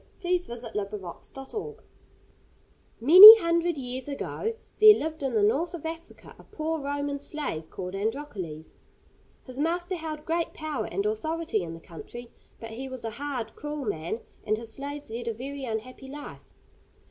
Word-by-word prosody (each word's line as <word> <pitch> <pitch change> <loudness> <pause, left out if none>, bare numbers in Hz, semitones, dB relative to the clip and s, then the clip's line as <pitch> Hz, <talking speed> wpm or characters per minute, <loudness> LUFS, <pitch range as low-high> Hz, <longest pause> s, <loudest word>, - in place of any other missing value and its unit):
THE 360 +1 +2
STORY 240 -9 -8 0.2
OF 200 +1 -8
ANDROCLES 185 -5 -8
AND 270 0 -8
THE - - -8
LION 445 +1 -8 1.3
Many 375 - +13
hundred 340 -3 0
years 255 0 -5
ago, 430 +10 -4 0.2
there 430 0 +9
lived 315 -2 -4
in 270 -3 -2
the 210 - +3
north 315 +12 +1
of 325 - -9
Africa 330 +1 -8
a - - -14
poor 320 +1 -4
Roman 285 0 -3
slave 275 - -5
called 180 0 -7
Androcles. 195 - -5 0.7
His 255 0 -9
master 345 +4 -1
held 315 -3 -6
great 335 +1 -2
power 310 -3 -4
and 395 - -3
authority 330 - -2
in 165 -2 -6
the 165 - -9
country, 235 +9 -11 0.3
but 225 0 -8
he 260 +4 -7
was 260 -3 -7
a 225 - -3
hard, 245 -2 -5
cruel 295 -2 -5
man, 175 +3 -3 0.2
and 215 +1 0
his 225 0 -9
slaves 285 -1 -7
led 235 +1 -6
a 230 - -2
very 275 +3 -6
unhappy 250 +4 -6
life. 290 +2 -10
280 Hz, 170 wpm, -27 LUFS, 225-320 Hz, 1.3 s, Many